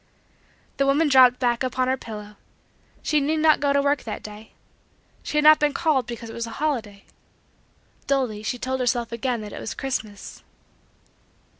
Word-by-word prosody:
The 275 Hz, -, +1 dB
woman 295 Hz, +3 st, +3 dB
dropped 255 Hz, -2 st, +6 dB
back 240 Hz, -2 st, 0 dB
upon 255 Hz, 0 st, -1 dB
her 260 Hz, -, +2 dB
pillow. 210 Hz, -4 st, -9 dB, 0.7 s
She 305 Hz, -, +2 dB
need 300 Hz, +3 st, 0 dB
not 310 Hz, -1 st, +4 dB
go 285 Hz, -1 st, +1 dB
to 280 Hz, 0 st, +2 dB
work 285 Hz, -1 st, +1 dB
that 220 Hz, -, -6 dB
day. 210 Hz, +1 st, -11 dB, 0.7 s
She 300 Hz, -, -4 dB
had 300 Hz, -, +3 dB
not 310 Hz, 0 st, +8 dB
been 295 Hz, -1 st, +1 dB
called 295 Hz, -8 st, +1 dB
because 235 Hz, -1 st, -7 dB
it 225 Hz, -, -9 dB
was 235 Hz, 0 st, -4 dB
a 225 Hz, -, -9 dB
holiday. 230 Hz, -10 st, -3 dB, 1.0 s
Dully 255 Hz, -7 st, 0 dB
she 215 Hz, +3 st, -3 dB
told 260 Hz, +2 st, -3 dB
herself 240 Hz, -2 st, 0 dB
again 235 Hz, 0 st, -2 dB
that 210 Hz, -1 st, -8 dB
it -, -, -7 dB
was -, -, -5 dB
Christmas. 220 Hz, -7 st, -5 dB
255 Hz, 175 wpm, -24 LUFS, 225-280 Hz, 1.0 s, not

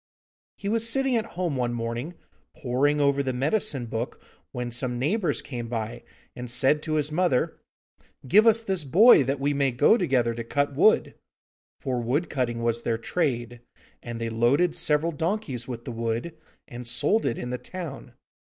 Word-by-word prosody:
He 200 Hz, -, -6 dB
was 230 Hz, +2 st, +2 dB
sitting 270 Hz, +1 st, +1 dB
at 225 Hz, -1 st, -1 dB
home 175 Hz, -5 st, -1 dB
one 120 Hz, -2 st, -1 dB
morning 120 Hz, +8 st, -4 dB, 0.4 s
poring 140 Hz, +4 st, +1 dB
over 140 Hz, -1 st, +2 dB
the 130 Hz, -2 st, -2 dB
medicine 140 Hz, -, 0 dB
book, 115 Hz, +2 st, -4 dB, 0.3 s
when 125 Hz, -2 st, -4 dB
some 120 Hz, +1 st, -1 dB
neighbours 150 Hz, -, 0 dB
came 120 Hz, -4 st, -6 dB
by 115 Hz, -1 st, -4 dB, 0.3 s
and 125 Hz, 0 st, -7 dB
said 130 Hz, +5 st, +2 dB
to 155 Hz, -, -3 dB
his 150 Hz, 0 st, -1 dB
mother: 155 Hz, -5 st, 0 dB, 0.7 s
'Give 215 Hz, -, +5 dB
us 225 Hz, 0 st, +5 dB
this 190 Hz, -6 st, -2 dB
boy, 180 Hz, -, +6 dB
that 135 Hz, +2 st, -1 dB
we 145 Hz, +1 st, 0 dB
may 140 Hz, -1 st, +1 dB
go 145 Hz, -, +4 dB
together 130 Hz, -, +1 dB
to 115 Hz, 0 st, -5 dB
cut 140 Hz, +4 st, -1 dB
wood.' 190 Hz, +10 st, +3 dB, 0.7 s
For 125 Hz, -3 st, -2 dB
wood 135 Hz, +9 st, -1 dB
cutting 120 Hz, -4 st, -2 dB
was 115 Hz, 0 st, 0 dB
their 115 Hz, -1 st, -1 dB
trade, 120 Hz, -3 st, -2 dB, 0.4 s
and 120 Hz, -1 st, -6 dB
they 115 Hz, 0 st, -2 dB
loaded 135 Hz, +10 st, +2 dB
several 165 Hz, -1 st, +2 dB
donkeys 160 Hz, -, -3 dB
with 120 Hz, -2 st, -7 dB
the -, -, -5 dB
wood, 115 Hz, +7 st, -3 dB, 0.3 s
and 120 Hz, -2 st, -8 dB
sold 200 Hz, -, +2 dB
it 120 Hz, -, -1 dB
in 125 Hz, -, -5 dB
the 125 Hz, -, -3 dB
town. 155 Hz, -9 st, -8 dB
135 Hz, 175 wpm, -26 LUFS, 120-165 Hz, 0.7 s, boy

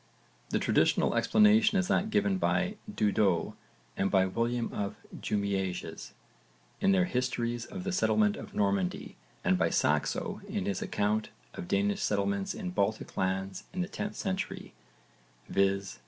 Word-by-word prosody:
The -, -, +1 dB
traditional -, -, +2 dB
explanation 215 Hz, 0 st, +4 dB
is 190 Hz, -1 st, +1 dB
that 205 Hz, +4 st, +1 dB
given 200 Hz, -3 st, +1 dB
by 195 Hz, +3 st, +1 dB
Dudo 105 Hz, -, +1 dB, 0.4 s
and 95 Hz, -, +1 dB
by 95 Hz, -1 st, +4 dB
William 115 Hz, +4 st, -1 dB
of 100 Hz, -1 st, -3 dB, 0.2 s
Jumièges 100 Hz, -3 st, -3 dB, 0.7 s
in 195 Hz, -, +3 dB
their 185 Hz, -2 st, +4 dB
histories 120 Hz, -5 st, -2 dB
of 190 Hz, -3 st, -7 dB
the 195 Hz, -, -2 dB
settlement 210 Hz, +2 st, +2 dB
of -, -, -9 dB
Normandy 100 Hz, -3 st, 0 dB, 0.3 s
and -, -, +2 dB
by -, -, +3 dB
Saxo -, -, 0 dB
in -, -, -2 dB
his 100 Hz, -2 st, -2 dB
account 105 Hz, +1 st, 0 dB, 0.2 s
of 85 Hz, -, -7 dB
Danish 100 Hz, +1 st, +1 dB
settlements 100 Hz, -1 st, 0 dB
in 90 Hz, -, -4 dB
Baltic 100 Hz, +3 st, -1 dB
lands 95 Hz, 0 st, -2 dB
in 185 Hz, -, -2 dB
the 180 Hz, -, -1 dB
10th 205 Hz, +1 st, -5 dB
century, 190 Hz, -1 st, -4 dB, 0.7 s
viz. 100 Hz, 0 st, 0 dB
110 Hz, 140 wpm, -30 LUFS, -, 0.7 s, explanation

